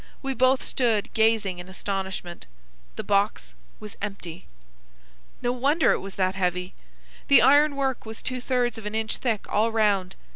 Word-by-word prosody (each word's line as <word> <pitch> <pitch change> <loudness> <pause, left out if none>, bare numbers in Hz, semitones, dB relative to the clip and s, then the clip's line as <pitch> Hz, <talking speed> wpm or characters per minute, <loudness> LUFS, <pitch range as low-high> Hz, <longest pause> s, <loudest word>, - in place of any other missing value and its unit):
We 270 0 -1
both 260 +1 +3
stood 230 -5 0
gazing 220 -5 +2
in 180 +1 -9
astonishment. 190 - -5 0.5
The - - -5
box 200 - 0 0.3
was 210 -1 -9
empty! 185 -4 -6 1.0
No 245 - +1
wonder 280 +6 +2
that - - +6
it - - 0
was 195 -1 -8
heavy. 185 -1 -1 0.5
The 280 - +7
iron 290 +3 +5
work 270 -2 -1
was 220 0 -9
two 255 -1 -3
thirds 245 -3 0
of 210 - -7
an 210 - -4
inch 220 0 -2
thick 225 -5 -2
all 220 +2 +1
round. 205 -4 +1
215 Hz, 160 wpm, -25 LUFS, 190-250 Hz, 1.0 s, The